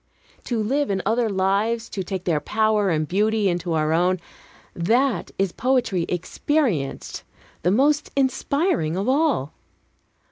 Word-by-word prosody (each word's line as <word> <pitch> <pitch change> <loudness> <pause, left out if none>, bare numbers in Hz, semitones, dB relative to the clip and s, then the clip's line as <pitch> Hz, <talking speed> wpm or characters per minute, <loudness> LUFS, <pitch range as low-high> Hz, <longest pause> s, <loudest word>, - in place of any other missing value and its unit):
To 240 -3 -1
live 280 +5 0
in 190 -2 -1
other 225 +2 +1
lives, 205 +4 0
to 195 - -4
take 185 0 -4
their 165 -5 +1
power 215 +4 +1
and 155 -2 0
beauty 210 +3 +1
into 175 -1 -1
our 155 0 +1
own, 180 +2 +2 0.6
that 235 +8 +1
is 195 -2 +1
poetry 235 -8 0
experienced, 185 - -1 0.4
the 180 - +2
most 285 +9 +2
inspiring 270 - 0
of 195 +4 -2
all. 270 - +1
205 Hz, 135 wpm, -23 LUFS, 175-250 Hz, 0.6 s, own